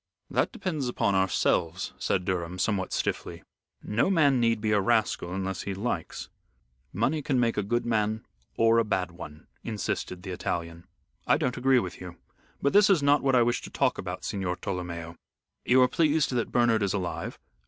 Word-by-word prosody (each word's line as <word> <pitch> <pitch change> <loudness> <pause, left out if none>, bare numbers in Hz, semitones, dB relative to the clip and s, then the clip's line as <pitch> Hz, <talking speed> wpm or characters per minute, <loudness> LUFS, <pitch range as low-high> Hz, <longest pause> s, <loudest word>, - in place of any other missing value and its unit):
"That - - +1
depends 155 -8 -3
upon 110 -4 0
ourselves," 95 -3 +1
said 90 -2 0
Durham, 90 -1 -2
somewhat 95 0 -1
stiffly. - - -3 0.4
"No 110 - +1
man 145 -8 +4
need 115 -1 +2
be 105 0 -1
a 105 -1 +3
rascal 110 -4 +1
unless 95 -1 -3
he 100 - -4
likes." 95 -5 -3 0.6
"Money 135 - 0
can 135 -2 0
make 115 -1 +2
a - - +1
good 120 +4 -1
man 110 -1 0 0.3
or 115 0 +4
a - - +3
bad 95 -4 -1
one," 80 -2 -10 0.2
insisted 100 -4 -3
the 95 - -6
Italian. 85 -1 -4 0.4
"I - - +5
don't 125 - -1
agree 130 +1 +3
with 95 -7 -3
you. 90 -1 -8 0.5
But 140 - +2
this 205 0 +6
is 180 -7 +4
not 145 +1 +4
what 135 -1 +2
I 120 - +5
wish 120 +1 0
to - - -9
talk - - 0
about, 90 0 -5
Signor 95 -3 -2
Tolomeo. 85 -3 -5 0.5
You 130 +1 +5
are - - +5
pleased 155 +1 +2
that 120 -2 -1
Bernard 120 -3 +3
is 100 0 0
alive." 90 -3 -4
105 Hz, 185 wpm, -27 LUFS, 90-125 Hz, 0.6 s, this